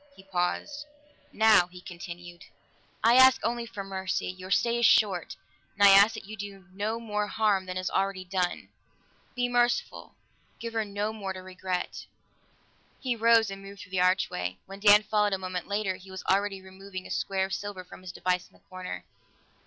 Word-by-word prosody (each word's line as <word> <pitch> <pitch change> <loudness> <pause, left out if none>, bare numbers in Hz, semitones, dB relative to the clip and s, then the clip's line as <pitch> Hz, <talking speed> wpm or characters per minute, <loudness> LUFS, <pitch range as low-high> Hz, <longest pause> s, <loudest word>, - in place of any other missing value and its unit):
He 190 - -15
paused. 195 +11 -2 0.4
"Now," 220 -5 +5
he 180 0 -13
continued, 175 -1 -10 0.6
"I 235 +2 +6
ask 260 0 +8
only 235 0 -1
for 210 -4 -6
mercy; 190 -1 -3
your 185 0 -7
stay 235 +4 +2
is 235 - +3
short, 190 -6 +3 0.4
and 200 0 +7
I - - +9
ask 200 +3 +7
that - - -8
you 215 +2 -8
do 200 -2 -8
no 215 +4 -2
more 210 -2 -2
harm 205 -3 +1
than 185 0 -4
is 185 0 -2
already 195 -1 -1
done. 180 -1 -2 0.7
Be 245 0 +1
merciful; 240 0 0 0.4
give 230 -1 -6
her 225 -1 0
no 205 +1 -3
more 195 -3 -5
to 185 0 -9
regret." 185 -1 -4 0.9
He 255 -3 -1
rose 230 -2 +4
and 195 0 -7
moved 195 0 -11
through 185 - -13
the 185 -1 +1
archway; 95 - +1
when 195 +1 -10
Dan 205 0 +7
followed 210 -1 +1
a - - +1
moment 185 -1 -5
later, 200 -2 -1
he 190 - -15
was 190 0 -7
already 195 0 0
removing 190 0 -9
a - - -9
square 190 -1 0
of 190 - -6
silver 205 -2 -5
from 180 - -13
his 185 -1 -8
device 180 0 -1
in - - -30
the - - -24
corner. 185 0 -6
195 Hz, 190 wpm, -28 LUFS, 185-215 Hz, 0.9 s, I